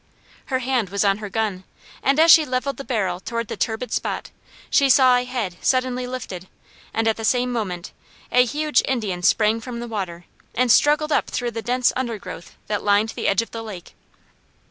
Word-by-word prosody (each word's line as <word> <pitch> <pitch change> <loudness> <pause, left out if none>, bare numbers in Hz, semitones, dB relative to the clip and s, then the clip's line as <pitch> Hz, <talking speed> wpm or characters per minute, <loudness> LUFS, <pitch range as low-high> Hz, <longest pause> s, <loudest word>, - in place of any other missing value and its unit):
Her 260 - -1
hand 255 -5 -1
was 200 +2 0
on 200 +1 +2
her 210 -1 -6
gun, 205 -3 -2 0.4
and 275 +2 +2
as 325 +1 +7
she 320 - +8
leveled 265 0 -2
the 275 - -6
barrel 200 -8 -1
towards 230 +3 -4
the - - -3
turbid 225 +2 -2
spot, - - -3 0.4
she 275 -2 +4
saw 255 -1 +6
a 245 0 +1
head 235 -8 -3
suddenly 255 -1 0
lifted, 200 -8 -6 0.4
and 225 0 0
at 220 - +2
the 225 - -6
same 250 +2 +1
moment 185 -7 -4 0.4
a 250 - +6
huge 295 +2 +1
Indian 215 -9 -2
sprang 215 +4 +3
from 240 0 -6
the 240 - -5
water 185 -6 -5 0.3
and 250 -1 +3
struggled 300 +4 +4
up - - +2
through 240 -1 -3
the 225 0 -5
dense 250 +1 +1
undergrowth 230 -8 -5
that 210 -1 -2
lined 205 +2 +3
the - - -3
edge 200 +3 +3
of 230 - -14
the 230 - -5
lake. 205 -6 -9
230 Hz, 195 wpm, -22 LUFS, 205-255 Hz, 0.4 s, she